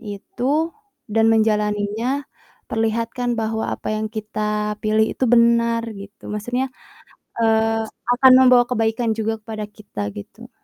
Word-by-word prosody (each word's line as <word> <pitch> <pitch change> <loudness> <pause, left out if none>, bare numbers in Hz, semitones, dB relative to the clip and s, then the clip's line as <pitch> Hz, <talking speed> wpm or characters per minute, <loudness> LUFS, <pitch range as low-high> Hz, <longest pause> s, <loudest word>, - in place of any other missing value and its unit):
itu 250 +9 -2 0.3
dan 225 +1 +2
menjalaninya, 215 +4 +1 0.5
perlihatkan 230 +2 -1
bahwa 220 0 -2
apa - - -4
yang 220 - -1
kita 210 -1 -3
pilih 215 0 +2
itu - - -1
benar, 235 -1 +4
gitu. 200 +1 -10
Maksudnya, 245 +5 -2 0.7
eee, 225 0 +2 0.3
akan 260 +1 +6
membawa 255 -1 +7
kebaikan 225 0 0
juga 220 0 -2
kepada 215 -1 -5
kita, 205 - -7
gitu. 100 - -11
225 Hz, 120 wpm, -21 LUFS, 210-235 Hz, 0.7 s, membawa